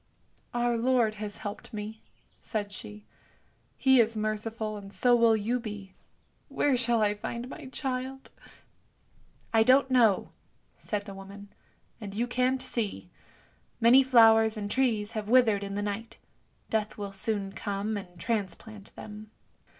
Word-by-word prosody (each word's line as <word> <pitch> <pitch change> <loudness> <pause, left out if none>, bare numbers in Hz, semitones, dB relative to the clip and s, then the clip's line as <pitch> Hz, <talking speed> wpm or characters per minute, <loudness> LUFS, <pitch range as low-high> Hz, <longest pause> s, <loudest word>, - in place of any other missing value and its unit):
" - - -40
" - - -41
Our 240 0 +1
Lord 235 -2 +2
has 205 -1 -5
helped 205 -1 -7
me," 215 +1 -6 0.4
said 205 -3 -3
she. 105 - -10 0.3
" - - -39 0.3
He 265 -1 +5
is 225 -1 +2
merciful, 215 0 -2
and 200 -1 -9
so 245 +3 +4
will 230 -2 +5
you 230 +4 -1
be. 205 -4 -8 0.6
Where 285 -3 +2
shall 235 -2 +2
I 205 0 +2
find 235 +4 -5
my 265 - -9
child? 265 0 -4 0.4
" - - -40
" - - -34
I 225 - +5
don't 260 +3 +4
know," 230 -6 +3 0.5
said 205 -1 -3
the 200 - -8
woman, 200 +1 -11 0.3
" - - -38
and 200 -2 -7
you 235 +3 +1
can't 255 +1 0
see. 235 -5 -4 0.7
Many 240 +3 +7
flowers 225 -3 +5
and 205 -1 -4
trees 225 -5 +1
have 215 -1 -4
withered 225 -5 +4
in 200 0 -5
the 205 - -2
night; 210 +2 -5 0.5
Death 215 -1 -1
will 200 -1 -5
soon 195 0 -2
come 205 +2 -3
and 180 -4 -8
transplant 210 0 -4
them. 215 0 -9
220 Hz, 160 wpm, -28 LUFS, 205-240 Hz, 0.7 s, Many